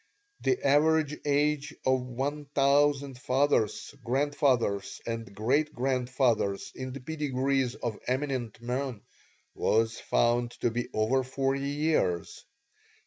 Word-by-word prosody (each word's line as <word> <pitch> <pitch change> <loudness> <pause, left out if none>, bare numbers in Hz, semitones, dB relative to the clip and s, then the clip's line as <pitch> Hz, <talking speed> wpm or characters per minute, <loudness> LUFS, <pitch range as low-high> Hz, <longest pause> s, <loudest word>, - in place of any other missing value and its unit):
The 385 - 0
average 150 +1 +3
age 145 0 +1
of 130 0 +3
one 135 +4 -3
thousand 140 -1 +3
fathers, 130 -4 +1
grandfathers, 130 -6 +1
and 115 -1 -4
great 140 +9 +1
grandfathers 125 -5 0
in 130 0 -6
the 140 - -6
pedigrees 135 -3 -1
of 115 -3 -4
eminent 130 -4 -2
men 125 -2 -3 0.5
was 115 +1 +1
found 120 0 +1
to 120 - +2
be 120 +1 -3
over 110 +5 +2
forty 135 +1 -1
years. 145 - 0
130 Hz, 110 wpm, -29 LUFS, 120-145 Hz, 0.5 s, average